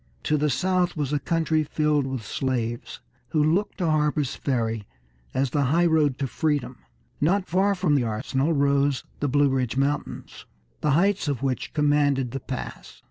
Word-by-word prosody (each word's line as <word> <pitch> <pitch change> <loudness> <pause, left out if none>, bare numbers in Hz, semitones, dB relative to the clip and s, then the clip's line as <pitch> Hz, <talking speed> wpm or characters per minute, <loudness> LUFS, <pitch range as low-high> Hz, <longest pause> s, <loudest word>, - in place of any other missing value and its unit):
To 155 - +1
the 150 0 +1
south 180 +5 +1
was 145 -1 -1
a 145 - +2
country 160 +1 +1
filled 150 -2 +1
with 130 -5 -4
slaves, 120 -1 -3 0.3
who 155 -2 +2
looked 170 +7 +1
to 180 - -1
Harper's 150 -3 +1
Ferry 115 -6 -2 0.4
as 130 -1 0
the 145 -2 +1
highroad 155 -2 +3
to 140 - -1
freedom. 145 -1 -1 0.4
Not 185 +5 +2
far 195 +3 +2
from 180 -5 +1
the 140 -3 +3
arsenal 125 +7 -1
rose 140 -1 +2 0.2
the 145 - 0
Blue 145 +1 +3
Ridge 130 -2 -1
Mountains, 140 +2 -3 0.3
the 150 - +1
heights 195 -1 +2
of 140 -3 -2
which 130 -2 -2
commanded 145 -4 +2
the 135 - -4
pass. 130 -2 -7
145 Hz, 165 wpm, -25 LUFS, 130-155 Hz, 0.4 s, highroad